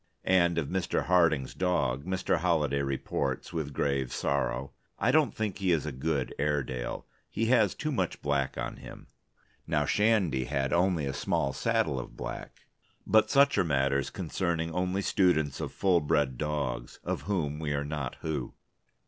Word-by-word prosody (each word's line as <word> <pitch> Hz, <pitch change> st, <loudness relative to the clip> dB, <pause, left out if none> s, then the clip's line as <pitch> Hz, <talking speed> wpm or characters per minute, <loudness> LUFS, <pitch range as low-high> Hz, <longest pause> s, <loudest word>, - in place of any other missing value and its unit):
And 85 Hz, -2 st, +3 dB
of 80 Hz, -4 st, 0 dB
Mr. 95 Hz, +1 st, -1 dB
Harding's 80 Hz, -7 st, +3 dB
dog 90 Hz, -7 st, 0 dB
Mr. 95 Hz, -1 st, 0 dB
Holliday 75 Hz, -5 st, +1 dB
reports, 70 Hz, +1 st, -2 dB
with 80 Hz, -3 st, -3 dB
grave 70 Hz, -2 st, -1 dB
sorrow: 70 Hz, -1 st, -1 dB, 0.3 s
"I 125 Hz, -, +2 dB
don't 155 Hz, 0 st, +3 dB
think 105 Hz, -4 st, -2 dB
he 95 Hz, -2 st, +1 dB
is 80 Hz, -3 st, +1 dB
a 75 Hz, -, -3 dB
good 70 Hz, +1 st, -2 dB
Airedale. 70 Hz, -4 st, -2 dB, 0.2 s
He 115 Hz, -, -1 dB
has 110 Hz, -6 st, +3 dB
too 155 Hz, -, -2 dB
much 95 Hz, -, -1 dB
black 70 Hz, -2 st, 0 dB
on 60 Hz, -1 st, -4 dB
him. -, -, -11 dB, 0.6 s
Now -, -, +1 dB
Shandy 100 Hz, -, +2 dB
had 70 Hz, 0 st, -1 dB
only 85 Hz, -3 st, +2 dB
a 70 Hz, -, -2 dB
small 70 Hz, -1 st, 0 dB
saddle 65 Hz, -, 0 dB
of -, -, -9 dB
black...." -, -, -7 dB, 0.4 s
But 110 Hz, 0 st, +4 dB
such 140 Hz, -3 st, +4 dB
are -, -, +4 dB
matters 70 Hz, -3 st, +1 dB
concerning 85 Hz, -2 st, -2 dB
only 90 Hz, +2 st, -1 dB
students 80 Hz, -9 st, +2 dB
of -, -, -3 dB
full 90 Hz, -3 st, +2 dB
bred 75 Hz, -3 st, +1 dB
dogs, 75 Hz, -3 st, -3 dB
of -, -, -2 dB
whom 75 Hz, -7 st, -1 dB
we 75 Hz, -2 st, -2 dB
are 70 Hz, 0 st, -1 dB
not 75 Hz, -4 st, -4 dB
who. 75 Hz, -6 st, -3 dB
80 Hz, 165 wpm, -29 LUFS, 70-90 Hz, 0.6 s, But